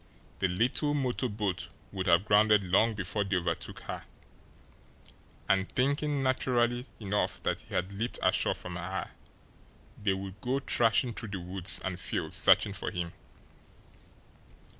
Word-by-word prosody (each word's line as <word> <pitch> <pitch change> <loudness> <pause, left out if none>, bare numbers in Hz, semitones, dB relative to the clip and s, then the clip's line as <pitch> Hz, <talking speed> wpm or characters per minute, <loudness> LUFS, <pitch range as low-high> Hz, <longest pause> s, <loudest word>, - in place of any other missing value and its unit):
The 95 - +2
little 125 - +1
motor 130 -2 0
boat 105 -4 -2 0.2
would 95 -2 -3
have 85 +3 +5
grounded 105 -1 +5
long 100 +5 +3
before 100 +1 -1
they 95 -1 -1
overtook 85 -2 -2
her, - - -6 1.4
and, 95 -1 +2
thinking 145 +2 +1
naturally 125 -1 +1
enough, 105 -1 -1
that - - 0
he - - -9
had 90 +2 0
leaped 110 +5 -3
ashore - - +3
from 90 -1 -6
her, 95 +2 -4 0.9
they 100 -2 +2
would 95 +1 -7
go 130 +2 0
thrashing 120 -1 +2
through 115 - -4
the 100 -1 -4
woods 90 +1 0
and 90 -1 -3
fields - - -1
searching 100 - +5
for 95 - -3
him! 85 -1 -4
100 Hz, 140 wpm, -30 LUFS, 95-120 Hz, 1.4 s, have